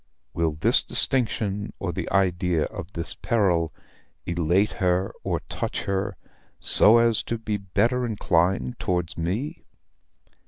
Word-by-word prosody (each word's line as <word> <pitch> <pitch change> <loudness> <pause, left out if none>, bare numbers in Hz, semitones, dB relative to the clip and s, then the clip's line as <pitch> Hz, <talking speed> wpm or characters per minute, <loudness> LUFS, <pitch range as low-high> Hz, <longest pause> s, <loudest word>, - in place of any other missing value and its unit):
"Will 80 -2 0
this 75 - +3
distinction 105 -5 0
or - - -3
the - - -4
idea 90 -4 +2
of 90 +5 -7
this 85 0 -3
peril 90 -9 +1 0.5
elate 85 +3 +1
her 90 +1 +1
or - - -1
touch - - -4
her, 100 -1 -2 0.4
so 110 +3 +6
as 115 -2 +4
to 115 - -3
be 110 -2 -2
better 105 +6 0
inclined 90 - 0
towards 90 -2 -1
me?" 95 - -3
95 Hz, 125 wpm, -25 LUFS, 85-110 Hz, 0.5 s, so